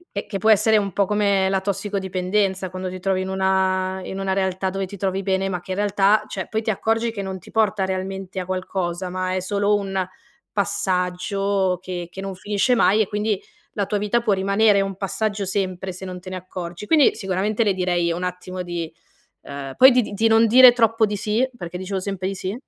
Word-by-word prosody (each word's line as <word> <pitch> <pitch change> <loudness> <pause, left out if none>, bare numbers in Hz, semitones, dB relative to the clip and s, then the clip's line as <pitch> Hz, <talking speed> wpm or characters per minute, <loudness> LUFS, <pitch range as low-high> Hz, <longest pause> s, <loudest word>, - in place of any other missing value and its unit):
e 200 - -3
che 195 - -4
può 220 +2 +2
essere 220 +1 +5
un 200 -2 +1
po' 200 +3 +1
come 200 -1 +2
la 190 0 +1
tossicodipendenza, 190 -1 -1
quando 185 0 -5
ti 185 0 -7
trovi 185 0 0
in 190 - -4
una 190 0 0
in 190 +1 -6
una 190 -1 -1
realtà 190 0 -1
dove 195 0 -3
ti 200 +2 -10
trovi 195 0 -1
bene 190 0 0
ma 180 -2 -3
che 185 - -9
in 185 - -2
realtà, 205 +1 +3
cioè, 190 -2 -5
poi 220 0 -1
ti 220 - -3
accorgi 225 +3 0
che 200 - -4
non 190 -1 -5
ti 180 - -16
porta 210 -3 +1
realmente 190 0 -4
a 180 - -6
qualcosa 185 -1 -3
ma 185 0 -2
è - - 0
solo 200 +2 0
un 195 -2 -1 0.5
passaggio 195 -1 0
che 175 -2 -6
che 190 - -10
non 195 -1 -5
finisce 205 +6 +1
mai 215 -2 +4
e 210 - +2
quindi 210 -1 -1 0.3
la 200 -2 -1
tua 205 +1 -1
vita 210 +3 +1
può 210 -3 +2
rimanere 200 +2 +3
un 195 -1 -3
passaggio 205 0 -2
sempre, 190 -1 -2
se 185 - -10
non 185 -1 -6
te 185 - -10
ne 185 - -5
accorgi. 180 +1 -7
Quindi 310 -4 +5
sicuramente 200 +2 -1
le 205 -3 +2
direi 175 -2 0
un 175 +2 -3
attimo 180 0 -5
di, 170 -2 -5 0.5
uhm, 140 -1 -7
poi 260 +1 +9
di 250 0 +4
di 210 - -6
di 220 +3 +2
non 225 +1 +5
dire 250 +2 +8
troppo 225 -1 +3
di 210 0 -3
sì, 220 +5 0
perché 175 -6 -6
dicevo 190 +1 -4
sempre 190 -1 -3
di 195 - -3
sì. 185 +1 -4
195 Hz, 220 wpm, -22 LUFS, 185-205 Hz, 0.5 s, poi